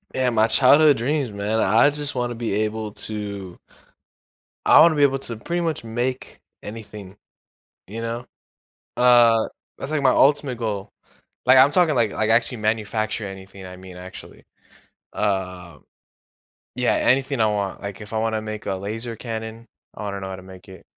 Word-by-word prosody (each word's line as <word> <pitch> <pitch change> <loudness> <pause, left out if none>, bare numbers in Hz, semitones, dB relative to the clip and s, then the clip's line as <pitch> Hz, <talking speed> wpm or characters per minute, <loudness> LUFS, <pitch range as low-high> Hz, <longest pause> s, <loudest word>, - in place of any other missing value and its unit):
Yeah, 130 -1 +1
my 110 -1 +3
childhood 145 +5 +5
dreams, 135 +1 -1
man, 105 +2 -2
I 115 +8 +4
just 145 -1 -4
want 120 -1 -1
to - - -5
be 115 -3 -3
able 110 -1 -4
to 100 -5 -7 1.1
I - - +7
want 170 - +8
to - - -2
be 145 - +3
able 135 -1 +3
to 120 -4 -6
pretty 170 +10 -3
much 165 -7 -2
make 120 +3 -4 0.2
anything, 105 -3 -9 0.7
you 110 +4 -7
know, 115 +2 -4 0.7
uh, 120 -2 +5 0.3
that's, 140 - -6
like, 155 -2 0
my 130 -2 +4
ultimate 140 -2 +2
goal, 105 -3 -4 0.5
like, 130 +1 +6
I'm 135 +2 +7
talking, 165 -2 +3
like 115 -4 +2
like, 110 0 0
actually 120 +2 +2
manufacture 110 0 -1
anything 95 0 -10
I 90 0 -10
mean 95 -1 -12
actually, 90 +1 -11 0.7
uh 90 -5 -3 1.0
yeah, 125 0 +1
anything 135 +1 +1
I 110 - +4
want. 100 -2 -2
Like, 100 0 -7
if 105 +1 -10
I 110 - 0
want 110 0 -1
to 110 - -2
make 110 0 -6
a 95 - -1
laser 110 +5 -5
cannon, 115 0 -6 0.3
I - - -7
wanna 100 -1 -4
know 95 - -5
how 95 - -5
to - - -11
make 95 -1 -14
it. 95 - -13
110 Hz, 175 wpm, -22 LUFS, 100-125 Hz, 1.1 s, want